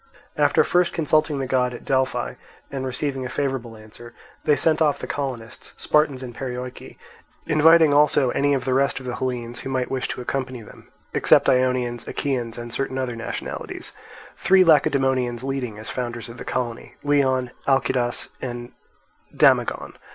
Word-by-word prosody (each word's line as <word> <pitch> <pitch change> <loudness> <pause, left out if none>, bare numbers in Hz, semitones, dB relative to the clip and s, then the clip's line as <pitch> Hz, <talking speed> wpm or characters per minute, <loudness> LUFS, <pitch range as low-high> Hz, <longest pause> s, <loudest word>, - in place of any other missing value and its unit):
After - - +4
first 180 0 +2
consulting 155 -1 +1
the 135 - -2
god 125 -1 0
at - - -11
Delphi 130 - 0 0.4
and 135 -1 -3
receiving 135 +1 -3
a 130 - -4
favourable 130 -5 -3
answer, 110 +2 -13 0.3
they 150 - +4
sent 155 +3 +2
off 150 -2 +3
the - - -6
colonists, 130 -4 -5
Spartans, 145 -4 +1
and 125 -2 -7
Perioeci, 125 0 -6 0.5
inviting 160 0 +5
also 145 -3 +4
any 145 0 +2
of 130 - -3
the 130 - +1
rest 135 +1 +2
of 130 - -11
the 125 0 -4
Hellenes 120 -2 -3
who - - -6
might 130 -1 -1
wish 130 -1 -1
to - - -5
accompany 130 -1 -3
them, - - -15 0.3
except - - +4
Ionians, 125 -2 +1
Achaeans, 125 -5 -2
and 120 -1 -7
certain 135 -1 -2
other 130 -2 -2
nationalities; 115 0 -5 0.5
three 190 0 +5
Lacedaemonians 130 -6 +2
leading 130 -5 -3
as 110 - -7
founders 120 -2 -4
of 115 - -10
the - - -7
colony, 120 -2 -4
Leon, 130 -4 +2 0.2
Alcidas, 130 -3 +1
and 120 -1 -5 0.6
Damagon. - - +2
130 Hz, 160 wpm, -23 LUFS, 120-140 Hz, 0.6 s, inviting